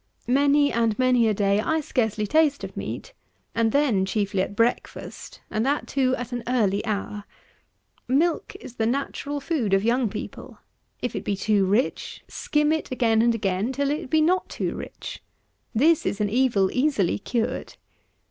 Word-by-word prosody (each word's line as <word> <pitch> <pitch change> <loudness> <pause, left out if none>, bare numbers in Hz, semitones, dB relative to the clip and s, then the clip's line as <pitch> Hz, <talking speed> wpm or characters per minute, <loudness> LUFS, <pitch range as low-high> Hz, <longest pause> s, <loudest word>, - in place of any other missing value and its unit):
Many 285 +3 +3
and 230 -2 +1
many 250 -2 +3
a 215 - +2
day 200 0 +2
I 320 +8 +1
scarcely 220 -7 -1
taste 300 +4 +2
of - - -7
meat, - - -6 0.4
and 230 -1 +2
then 260 -9 +2
chiefly 200 0 0
at 200 - -3
breakfast, 230 +3 -2
and 215 - 0
that, 285 +3 0
too, 260 -1 +1
at 245 0 -6
an 245 -1 -3
early 210 -6 +1
hour. 205 0 -3 0.8
Milk 310 +6 +1
is 245 - -11
the 225 - +1
natural 280 +3 -2
food 270 - 0
of 195 - +1
young 235 0 +2
people; - - -8 0.5
if 245 - -2
it - - -3
be 200 - -1
too 200 -1 +2
rich, 210 +7 -1
skim 300 0 0
it 315 0 -1
again 230 -3 +2
and 235 0 +3
again 200 +2 -1
till 280 +1 0
it 295 -3 -3
be 315 +2 +3
not 360 +4 +2
too - - -2
rich. - - -8 0.5
This 310 +7 +4
is 200 - -2
an 205 -1 0
evil 230 -6 +2
easily 255 - +1
cured. 235 +4 -2
240 Hz, 170 wpm, -25 LUFS, 210-280 Hz, 0.8 s, This